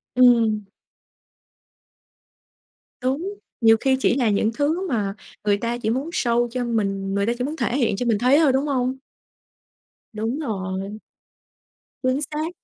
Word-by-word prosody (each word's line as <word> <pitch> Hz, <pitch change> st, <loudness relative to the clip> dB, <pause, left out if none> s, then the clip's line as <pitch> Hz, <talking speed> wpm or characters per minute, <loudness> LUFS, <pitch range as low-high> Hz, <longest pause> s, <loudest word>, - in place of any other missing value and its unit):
Ừm. 230 Hz, -4 st, +5 dB, 2.4 s
Đúng, 285 Hz, +10 st, -1 dB, 0.3 s
nhiều 225 Hz, -1 st, +6 dB
khi 265 Hz, +3 st, +2 dB
chỉ 255 Hz, -, +2 dB
là 250 Hz, -4 st, +2 dB
những 210 Hz, +2 st, +2 dB
thứ 315 Hz, +9 st, 0 dB
mà 210 Hz, -, -1 dB, 0.3 s
người 205 Hz, -1 st, +2 dB
ta 235 Hz, +3 st, -2 dB
chỉ 240 Hz, -2 st, -2 dB
muốn 265 Hz, +7 st, -1 dB
show 240 Hz, -7 st, +1 dB
cho 250 Hz, 0 st, -2 dB
mình 195 Hz, -4 st, -1 dB
người 200 Hz, 0 st, +1 dB
ta 235 Hz, -, +1 dB
chỉ 250 Hz, -, -2 dB
muốn 295 Hz, +4 st, -3 dB
thể 245 Hz, -3 st, -1 dB
hiện 235 Hz, -7 st, +1 dB
cho 245 Hz, -, -2 dB
mình 230 Hz, -3 st, +2 dB
thấy 255 Hz, +7 st, +4 dB
thôi, 295 Hz, -5 st, +4 dB
đúng 270 Hz, +2 st, +1 dB
hông? 260 Hz, -2 st, 0 dB, 1.2 s
Đúng 225 Hz, +6 st, -2 dB
rồi. 195 Hz, -5 st, -4 dB, 1.0 s
Chính 255 Hz, +1 st, +1 dB
xác. 305 Hz, +2 st, -2 dB
240 Hz, 150 wpm, -23 LUFS, 215-265 Hz, 2.4 s, nhiều